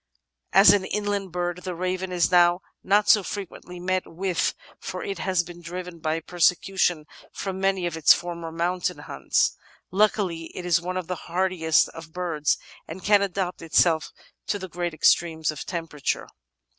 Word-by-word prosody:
As 195 +2 +8
an 200 -2 +2
inland 205 -1 -2
bird 175 0 -2
the 180 -1 -5
Raven 185 +1 -2
is 175 -1 +1
now 175 0 +5 0.2
not 205 +2 +3
so 210 - +6
frequently 180 -2 -7
met 185 +1 -2
with, 180 0 -1 0.2
for - - -6
it 400 -3 -4
has 185 -2 +1
been 175 0 -11
driven 175 0 -7
by 160 +1 -1
persecution 175 -1 +1 0.3
from 190 -1 -5
many 195 -1 +1
of 170 -2 -2
its 160 -2 +5
former 170 -1 0
mountain 175 +2 -1
haunts. - - 0 0.4
Luckily 190 -4 +1
it 180 - -5
is 170 -1 +3
one 185 +1 -3
of 185 - -3
the 180 -1 -6
hardiest 175 -2 +2
of 165 -1 -11
birds 165 -5 0 0.3
and 175 +4 -8
can 205 0 +5
adapt 190 -2 -2
itself 165 0 +2 0.4
to 200 -2 -2
great 175 -2 -4
extremes 160 -1 +2
of 155 - -7
temperature. 165 -5 -3
180 Hz, 160 wpm, -25 LUFS, 165-190 Hz, 0.4 s, As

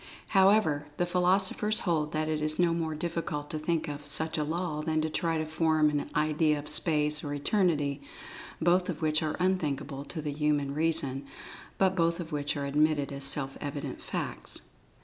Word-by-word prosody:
However, 190 -7 +3
the 175 - +1
philosophers 190 +4 +2
hold 155 -4 0
that 155 0 -1
it 155 -1 -1
is 155 0 0
no 175 -1 +3
more 160 -2 -2
difficult 155 -2 -4
to 155 - -2
think 160 +1 -1
of 145 0 -6
such 160 +2 +1
a 150 - 0
law 160 0 -2
than 155 0 0
to 155 0 -2
try 165 0 0
to 155 - -1
form 155 -1 +2
an 145 -1 -2
idea 150 0 +2
of 145 +1 -7
Space 150 -1 +3
or 145 -1 -3
Eternity, 145 -3 +1 0.6
both 180 +3 +2
of 160 -2 -4
which 155 0 +2
are 155 -1 -2
unthinkable 145 -6 -1
to 165 - -6
the 150 -1 -3
human 145 -2 0
reason, 140 -3 +1 0.5
but 190 -1 +2
both 170 -1 +1
of 170 -1 -6
which 145 -1 -2
are 140 - -2
admitted 145 0 +1
as 140 0 -3
self 135 0 0
evident 145 0 -5
facts. - - -5
155 Hz, 185 wpm, -29 LUFS, 145-170 Hz, 0.6 s, However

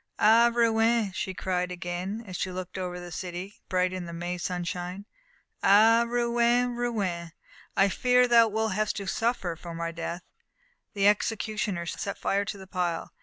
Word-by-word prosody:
"Ah, 230 +3 +6
Rouen!" 230 -2 +2
she 190 0 -3
cried 180 -1 -1
again, 180 +4 -4
as 185 -3 -8
she 185 - -2
looked 185 0 -6
over 180 -1 -4
the 175 0 -9
city, 180 +4 -6
bright 185 0 +1
in 185 -1 -4
the - - -6
May 175 +1 -4
sunshine 180 +2 -4 0.6
"Ah, 225 +4 +6
Rouen, 240 +1 +2
Rouen! 195 -9 -2 0.4
I 195 - +5
fear 250 +5 +3
thou 230 -1 +6
wilt 220 0 -1
have 215 +1 0
to 200 - -5
suffer 195 -4 -1
for 170 0 -9
my 165 0 -3
death!" 170 +1 -5 0.7
The 200 0 +3
executioner 210 -3 0
set 200 +4 -4
fire 200 +1 0
to 210 0 -5
the 190 - -10
pile. 180 -3 -2
195 Hz, 165 wpm, -27 LUFS, 180-225 Hz, 0.7 s, Ah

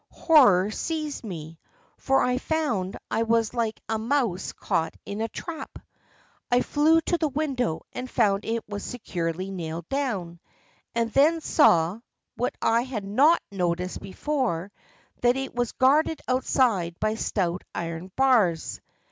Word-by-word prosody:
Horror 215 - +5
seized 305 +3 -3
me, 165 -6 -7 0.4
for 270 0 +2
I 250 0 +1
found 250 - -1
I 225 - +1
was 230 0 +1
like 230 -2 -1
a 220 0 -1
mouse 230 -6 0
caught 160 - -2
in 205 +2 -5
a 225 - 0
trap. 330 +7 -7 0.7
I 245 0 +4
flew 315 +4 +3
to 345 +1 -1
the 315 - +2
window 265 - -1
and 250 0 -5
found 205 -5 +2
it 225 0 -2
was 205 -1 -5
securely 185 -5 -4
nailed 170 -2 -5
down, 200 -12 -2 0.6
and 230 -1 0
then 315 +4 +4
saw, 180 - +3 0.4
what 245 - -2
I 230 +1 +3
had 240 -5 -5
not 280 +12 +4
noticed 180 -1 -2
before, 200 - -2 0.5
that 245 +1 +3
it 270 0 -4
was 245 -1 -1
guarded 300 +4 +3
outside 235 -9 +1
by 215 0 +1
stout 185 -5 -1
iron 170 +2 -5
bars. 225 -12 +2
225 Hz, 140 wpm, -26 LUFS, 185-270 Hz, 0.7 s, Horror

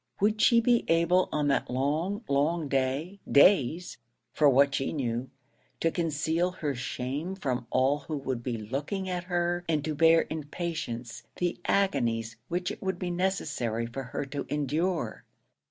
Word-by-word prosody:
Would 215 +2 +2
she 235 - +6
be 235 0 +3
able 170 +2 +3
on 150 -1 0
that 140 - +1
long, 155 - -1
long 150 +3 +1
day 140 +8 -1
days, 170 +1 +4 0.3
for 150 - +5
what 140 +1 +4
she 135 0 -1
knew 125 -3 -2 0.5
to 165 - +2
conceal 165 +1 0
her 150 -5 -2
shame 135 +8 -4
from 130 -9 -3
all 130 +4 +2
who 150 +1 -5
would 130 -3 -3
be 120 -1 -3
looking 140 - -3
at 180 -1 -3
her, 175 -1 0
and 150 -3 +1
to 155 - -1
bear 165 +2 +5
in 155 -2 -5
patience 125 -9 -5
the 175 -1 -1
agonies 115 - +1
which 180 +1 -2
it - - -8
would 190 -2 -2
be 180 -1 -3
necessary 150 - -1
for 120 +3 -5
her 125 +4 -4
to 140 +1 -5
endure? 155 +5 -1
150 Hz, 160 wpm, -28 LUFS, 135-175 Hz, 0.5 s, she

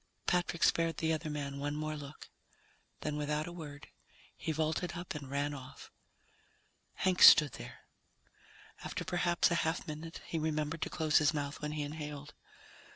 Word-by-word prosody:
Patrick 175 -1 +1
spared 165 0 +3
the 160 0 +1
other 155 0 -3
man 140 -2 -4
one 145 +1 -2
more 155 0 -3
look. 145 0 -10 0.7
Then, 150 -1 -2
without 150 +1 -1
a 175 - -7
word, 150 -4 -9 0.5
he - - -3
vaulted 160 +3 -1
up 175 +2 -5
and 145 -4 -7
ran 145 +1 -1
off. 130 -2 -10 1.0
Hank 185 -1 +1
stood 150 -3 +10
there. - - -10 1.0
After - - -4
perhaps 175 -1 +2
a 170 - +2
half 160 +3 -1
minute 160 +2 -7
he 165 - -2
remembered 155 0 -1
to - - -1
close 155 -2 +3
his 155 +1 +2
mouth 145 -1 -3
when 150 0 -3
he 150 -1 -2
inhaled. 145 -1 -6
155 Hz, 160 wpm, -33 LUFS, 145-165 Hz, 1.0 s, stood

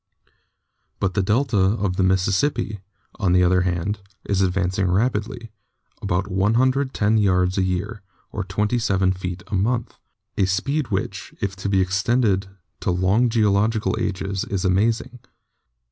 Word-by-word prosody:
But 95 -1 0
the 100 - +1
delta 110 +3 +1
of 95 0 +1
the 95 - 0
Mississippi, 100 +5 +1 0.4
on 95 -5 +2
the 90 0 +5
other 90 +1 +3
hand, 90 +3 -1 0.3
is 100 -1 0
advancing 95 0 0
rapidly, 115 +3 -1 0.5
about 90 +3 -1
no 115 +3 +1
yards 90 -2 +2
a - - +2
year, 95 +4 -2 0.3
or 105 - -3
27 100 -1 +1
feet 90 -1 -6
a - - -10
month, 115 +5 -1 0.4
a 95 - +4
speed 130 +10 -1
which, 95 -3 -4
if 100 -1 -2
it 100 - -1
be 95 -1 +3
extended 100 +1 +1 0.3
to - - -2
long 95 +7 +2
geological 110 0 +1
ages, 100 -2 -2
is 95 -2 -2
amazing. 110 +6 0
100 Hz, 135 wpm, -22 LUFS, 95-110 Hz, 0.5 s, the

